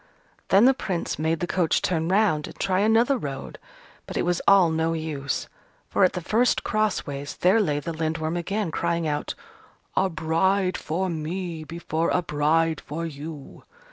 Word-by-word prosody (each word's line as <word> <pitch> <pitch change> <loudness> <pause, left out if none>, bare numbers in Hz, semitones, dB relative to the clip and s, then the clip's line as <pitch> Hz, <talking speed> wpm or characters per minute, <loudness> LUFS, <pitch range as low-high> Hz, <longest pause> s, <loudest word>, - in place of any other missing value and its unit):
Then 195 +4 +6
the 265 - +7
Prince 185 - -3
made 160 +1 0
the - - +1
coach 175 -2 +1
turn 165 -2 0
round 190 -6 +2
and - - -12
try 185 -1 +1
another 230 +5 +3
road: 140 -6 -6 0.5
but - - -5
it - - +1
was 175 -1 0
all 195 -4 +6
no 160 +1 0
use. 150 -4 -3 0.4
For, - - +2
at 185 - +4
the 180 - -3
first 230 +8 +2
cross 215 -2 0
ways, 140 0 -6
there 195 +5 +4
lay 150 -7 0
the 165 +3 -5
Lindworm 160 0 -2
again, 190 +1 -2
crying 170 -1 -1
out, 150 -1 -2 0.6
"A 190 - +2
bride 185 +4 +1
for 180 +4 -2
me 165 0 -4
before 165 0 -2
a 180 - +1
bride 160 +1 +1
for 165 +3 -5
you!" 150 -1 -8
165 Hz, 170 wpm, -25 LUFS, 155-190 Hz, 0.6 s, the